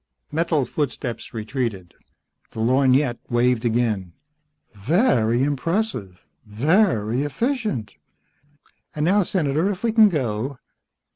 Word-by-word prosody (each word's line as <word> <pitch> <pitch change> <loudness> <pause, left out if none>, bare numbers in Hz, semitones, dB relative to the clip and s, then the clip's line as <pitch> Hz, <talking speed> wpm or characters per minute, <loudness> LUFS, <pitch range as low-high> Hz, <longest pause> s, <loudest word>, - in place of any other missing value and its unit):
Metal 160 -3 +1
footsteps 125 -3 -4
retreated. 110 -5 -4 0.6
The - - -7
lorgnette 130 +2 +2
waved 120 0 +1
again. 110 -6 0 0.6
"Very 120 - +2
impressive. 145 - -2 0.2
Very 120 - +1
efficient. 215 - -2 1.0
And 150 0 0
now, 200 +4 +4
Senator, 165 -1 0
if 195 0 -5
we 230 - +2
can 220 -1 +6
go. 130 - -2
130 Hz, 95 wpm, -22 LUFS, 115-165 Hz, 1.0 s, can